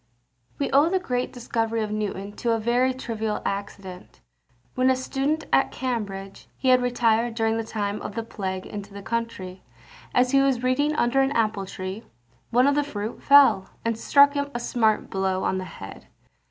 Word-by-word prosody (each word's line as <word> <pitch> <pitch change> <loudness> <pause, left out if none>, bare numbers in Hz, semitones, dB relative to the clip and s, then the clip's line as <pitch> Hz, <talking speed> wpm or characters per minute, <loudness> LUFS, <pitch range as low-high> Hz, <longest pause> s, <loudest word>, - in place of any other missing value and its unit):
We 280 - -2
owe 285 +4 +5
the 380 - +2
great 250 -9 -2
discovery 230 -2 -2
of 210 - -4
Newton 205 -1 -3
to 235 -1 0
a 225 - 0
very 245 +3 +2
trivial 225 -4 -3
accident. 195 -2 -6 0.5
When 255 +1 +2
a 260 - +4
student 275 +4 -1
at 270 - +4
Cambridge, 205 -6 -4
he 260 - 0
had 255 0 +6
retired 235 -1 +1
during 225 -1 +1
the 225 - -1
time 210 -2 -3
of 210 - -6
the 230 - -2
plague 190 -4 -5
into 205 -1 -8
the 200 - -8
country. 205 -6 -4 0.5
As 250 0 +2
he 275 - +5
was 265 -3 +1
reading 285 +4 +1
under 255 0 +2
an 270 +1 +1
apple 215 -5 0
tree, 190 +2 -6 0.5
one 250 +2 +4
of 285 - +4
the 290 +1 +2
fruit 220 -5 -5
fell, 275 -9 +6 0.2
and 230 0 +1
struck 285 +5 +5
him 285 0 -2
a - - -1
smart 225 -3 0
blow 190 -1 -1
on 190 - 0
the 185 - -5
head. - - -10
230 Hz, 185 wpm, -25 LUFS, 205-260 Hz, 0.5 s, had